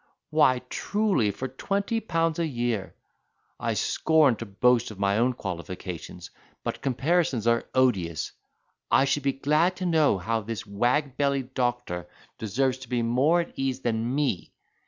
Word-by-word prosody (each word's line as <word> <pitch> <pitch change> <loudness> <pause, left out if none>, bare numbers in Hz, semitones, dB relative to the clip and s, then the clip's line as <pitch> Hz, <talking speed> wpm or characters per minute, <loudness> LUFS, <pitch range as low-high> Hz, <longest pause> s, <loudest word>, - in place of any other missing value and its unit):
why, 150 -5 +5
truly, 205 - +1
for 130 +6 -4
twenty 200 - -1
pounds 165 -6 0
a 165 - +1
year. 120 -7 -2 0.6
I - - -1
scorn 155 -6 +3
to 115 - -6
boast 120 +4 +2
of 105 - -10
my 100 +2 +1
own 125 +2 +3
qualifications 90 -2 -6 0.3
but—comparisons 135 -2 0
are 115 0 +2
odious. 95 - +1 0.6
I 135 - +5
should 140 +1 +1
be 140 0 +1
glad 155 +6 +2
to 185 - -4
know 160 - +3
how 110 +5 -1
this 115 +2 -5
wag 125 +7 0
bellied 140 -2 0
doctor 120 -10 -2 0.3
deserves 130 +5 0
to 130 -3 -11
be 120 -2 0
more 135 +9 +3
at 170 - -8
ease 135 -1 -2
than 115 +1 -1
me. 140 - -1
125 Hz, 150 wpm, -26 LUFS, 110-145 Hz, 0.6 s, why